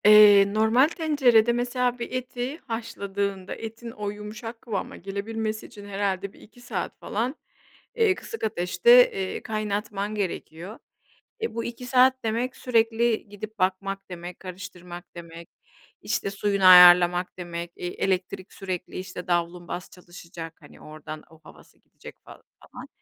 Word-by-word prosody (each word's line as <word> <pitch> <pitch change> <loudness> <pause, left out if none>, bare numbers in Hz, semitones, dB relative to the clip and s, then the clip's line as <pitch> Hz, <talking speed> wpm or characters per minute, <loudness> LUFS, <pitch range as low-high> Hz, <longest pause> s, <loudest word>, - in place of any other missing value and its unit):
Eee, 205 -1 +8
normal 220 +6 +4
tencerede 270 -9 +3
mesela, 245 0 -1
bir 235 - -5
eti 255 +2 -4
haşladığında, 200 -4 -4
etin 225 +1 -8
o 210 -2 -4
yumuşak 215 +3 -8
kıvama 210 -5 -4
gelebilmesi 215 +3 -4
için, 205 -1 -12
herhâlde 200 -1 -2
1-2 225 +3 -18
saat 195 -7 -5
falan, 240 +7 -2 0.6
eee, 445 -5 +3
kısık 450 - -8
ateşte, 475 - +5
eee, 190 -1 -4
kaynatman 210 -1 -3
gerekiyor. 190 0 -5 0.6
Eee, 450 - -3
bu 230 - -2
2 240 +1 -6
saat 255 +1 +4
demek, 230 +3 -1
sürekli 230 -2 +1
gidip 210 +1 -9
bakmak 195 +1 -1
demek, 175 0 -8
karıştırmak 180 -1 -9
demek, 170 0 -10 0.5
işte - - -2
suyunu 200 -1 0
ayarlamak 180 0 +8
demek. 170 -1 -6
Eee, 180 - -5
elektrik 185 +1 -2
sürekli 185 -2 -5
işte 185 -1 -8
davlumbaz 175 +1 -2
çalışacak, 175 -2 -10
hani, 145 - -16
oradan 155 0 -9
o 160 0 -18
havası - - -17
gidecek - - -14
falan, - - -14 0.3
falan. - - -9
205 Hz, 135 wpm, -25 LUFS, 180-230 Hz, 0.6 s, Eee